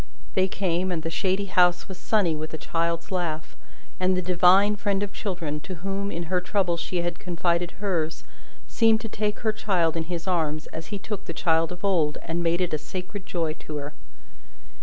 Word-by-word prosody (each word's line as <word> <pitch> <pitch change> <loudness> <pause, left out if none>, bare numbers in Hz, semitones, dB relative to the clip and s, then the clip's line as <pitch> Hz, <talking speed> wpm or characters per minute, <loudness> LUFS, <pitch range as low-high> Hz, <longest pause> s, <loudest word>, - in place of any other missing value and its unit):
They 190 0 +3
came, 185 -1 0
and 165 -3 -2
the 165 - -2
shady 190 +3 +1
house 180 -2 +3
was 190 - -7
sunny 190 -7 +2
with 155 +1 -4
a - - -4
child's 170 +2 -1
laugh, 165 -4 -2 0.4
and 185 0 +3
the - - +1
Divine 185 +3 +5
friend 200 -1 0
of 205 - -4
children, 170 -7 -3
to 185 +5 -7
whom 195 +3 -3
in 170 - -3
her 180 +2 0
trouble 180 -2 +1
she 170 +1 -2
had 175 0 -2
confided 175 0 0
hers, 170 -6 -1 0.4
seemed 225 -1 +4
to 225 - -4
take 210 0 -2
her 220 - +2
child 175 -7 +1
in 165 -1 -1
his 170 -1 -4
arms, 155 -4 0
as 160 0 -6
He 205 - -4
took 200 0 -5
the 170 - -4
child 165 0 +2
of 180 +2 -5
old, 165 -7 +2
and 165 +2 -2
made 170 +1 +2
it 180 -3 0
a 155 - +1
sacred 185 +4 -6
joy 165 -3 -1
to 155 - -7
her. 145 0 -4
180 Hz, 200 wpm, -26 LUFS, 165-195 Hz, 0.4 s, Divine